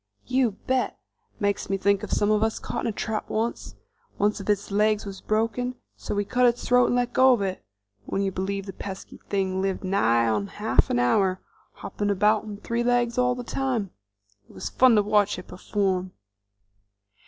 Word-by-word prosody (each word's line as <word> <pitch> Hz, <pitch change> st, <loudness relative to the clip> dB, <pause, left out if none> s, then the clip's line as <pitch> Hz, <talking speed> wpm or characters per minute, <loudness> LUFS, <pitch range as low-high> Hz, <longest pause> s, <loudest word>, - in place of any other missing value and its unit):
"You 255 Hz, -4 st, +1 dB
bet! 260 Hz, -1 st, 0 dB, 0.4 s
Makes 205 Hz, -2 st, -1 dB
me 195 Hz, -, +1 dB
think 200 Hz, +1 st, +2 dB
of 210 Hz, -, -6 dB
one -, -, +1 dB
some 205 Hz, 0 st, +2 dB
of 215 Hz, 0 st, +2 dB
us 220 Hz, 0 st, +1 dB
caught -, -, -4 dB
in -, -, +1 dB
a -, -, 0 dB
trap 215 Hz, +1 st, -3 dB
once. 225 Hz, +2 st, -3 dB, 0.4 s
One 205 Hz, +1 st, +3 dB
of 210 Hz, -1 st, -8 dB
its 205 Hz, 0 st, 0 dB
legs 210 Hz, +1 st, +2 dB
was 195 Hz, -1 st, -8 dB
broken, 230 Hz, +4 st, -1 dB, 0.2 s
so -, -, -5 dB
we 205 Hz, 0 st, 0 dB
cut 250 Hz, +4 st, +3 dB
its 240 Hz, 0 st, 0 dB
throat 250 Hz, 0 st, +5 dB
and -, -, +1 dB
let 245 Hz, 0 st, 0 dB
go 260 Hz, 0 st, +6 dB
of 220 Hz, -5 st, 0 dB
it. 190 Hz, -, -3 dB, 0.4 s
Would 195 Hz, -, -1 dB
you 195 Hz, -, 0 dB
believe 195 Hz, +1 st, -3 dB
the 195 Hz, -, -7 dB
pesky 190 Hz, +1 st, -8 dB
thing 190 Hz, -1 st, 0 dB
lived 195 Hz, 0 st, -2 dB
nigh 115 Hz, -, +2 dB
on 105 Hz, -3 st, 0 dB
half 120 Hz, -, +1 dB
an -, -, +1 dB
hour, 185 Hz, +10 st, +2 dB, 0.3 s
hopping 205 Hz, 0 st, -4 dB
about 210 Hz, +2 st, +2 dB
on 210 Hz, -1 st, -7 dB
three 235 Hz, +3 st, -2 dB
legs 245 Hz, 0 st, +1 dB
all 250 Hz, 0 st, +2 dB
the 250 Hz, -, -6 dB
time. 240 Hz, -6 st, -2 dB, 0.6 s
It -, -, -16 dB
was 95 Hz, -, -6 dB
fun 255 Hz, -2 st, +5 dB
to 210 Hz, -, +4 dB
watch 205 Hz, -1 st, +2 dB
it 180 Hz, -, -8 dB
perform!" 185 Hz, -1 st, -2 dB
205 Hz, 200 wpm, -25 LUFS, 195-235 Hz, 0.6 s, go